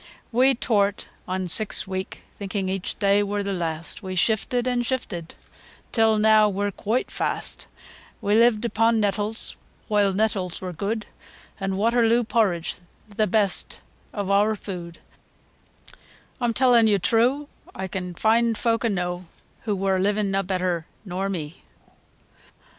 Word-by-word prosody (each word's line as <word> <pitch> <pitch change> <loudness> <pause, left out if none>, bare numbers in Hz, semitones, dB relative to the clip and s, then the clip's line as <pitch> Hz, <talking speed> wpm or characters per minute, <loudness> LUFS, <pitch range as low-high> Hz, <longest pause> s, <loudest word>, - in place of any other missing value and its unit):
III. - - -18 0.2
We 255 +3 +4
tow'rt 205 -4 +1 0.2
on 185 0 -2
six 215 +5 +3
week 190 0 -5 0.2
thinking 195 -1 -2
aitch 190 -1 -3
day 200 0 +3
wur 205 0 -1
th' 200 -1 -2
last, 165 -2 -3
We 185 -2 -5
shifted, 230 +6 +1
an' 245 -1 +1
shifted, 220 -10 -3 0.6
till 225 -2 +3
neaw 215 0 +5
we're 200 +1 -1
quoite 220 +6 -2
fast; - - -4 0.5
We 205 - 0
lived 230 0 +4
upo' 225 0 +2
nettles, 210 0 -1 0.4
whoile 205 -2 +3
nettles 195 -3 -1
wur 185 -1 -5
good, 210 +5 -3 0.5
An' 195 -1 -2
Waterloo 230 +2 +3
porridge 200 -7 0 0.3
the 215 +1 0
best 200 -1 +1 0.3
o' 205 - -3
eawr 205 +2 +2
food, 175 -4 -7 1.4
Oi'm 240 -1 +2
tellin' 245 -3 +5
yo' 205 -2 +4
true, 240 +9 +2 0.3
Oi 190 - -2
can 180 -1 -5
find 225 +3 +2
folk 230 -1 +1
enow, 180 -4 -1 0.4
As 210 - +2
wur 190 -1 +1
livin' 205 +1 +1
na 195 0 +1
better 180 -3 -2 0.2
nor 190 +1 -3
me. 165 -3 -5
205 Hz, 140 wpm, -24 LUFS, 190-225 Hz, 1.4 s, neaw